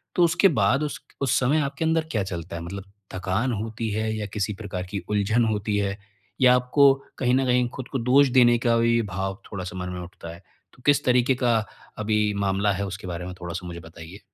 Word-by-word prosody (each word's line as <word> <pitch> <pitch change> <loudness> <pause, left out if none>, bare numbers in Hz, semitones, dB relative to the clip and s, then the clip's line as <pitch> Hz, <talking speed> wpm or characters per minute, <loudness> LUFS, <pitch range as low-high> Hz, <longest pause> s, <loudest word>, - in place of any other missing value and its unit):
तो 175 - +4
उसके 170 +4 +4 0.2
बाद 130 +9 +3
उस 150 - -4 0.2
उस 135 -4 +2
समय 135 +5 +2
आपके 145 +3 -2
अंदर 160 0 +1
क्या 105 -4 0
चलता 85 -2 -6
है? 85 - -5
मतलब 95 +3 -6 0.3
थकान 95 +7 -1
होती 115 0 -4
है 110 +1 -1
या 105 - -3
किसी 105 +1 -1
प्रकार 95 -3 -4
की 100 - -2
उलझन 105 +3 +2
होती 105 0 -1
है, 100 -1 -1 0.4
या 125 -1 +7
आपको 135 +2 +5 0.2
कहीं 125 -2 +1
न 135 0 +2
कहीं 125 -1 +2
खुद 130 -1 -6
को 135 - -1
दोष 130 +4 +5
देने 120 -1 +6
का 120 -1 +3
भी 115 0 +3
भाव 95 0 -4
थोड़ा-सा 95 -3 -5
मन 90 0 -4
में 90 - -5
उठता 90 -1 -10
है। 85 - -12 0.3
तो 125 - -20
किस 145 -1 +4
तरीक़े 125 +1 +3
का 120 -2 +2 0.4
अभी 105 -1 +1
मामला 100 +1 +1
है 100 +1 -2
उसके 95 0 -7
बारे 90 0 -5
में 90 - -6
थोड़ा-सा 90 +1 -5
मुझे 85 -1 -7
बताइए? 80 +3 -11
105 Hz, 220 wpm, -25 LUFS, 95-125 Hz, 0.4 s, या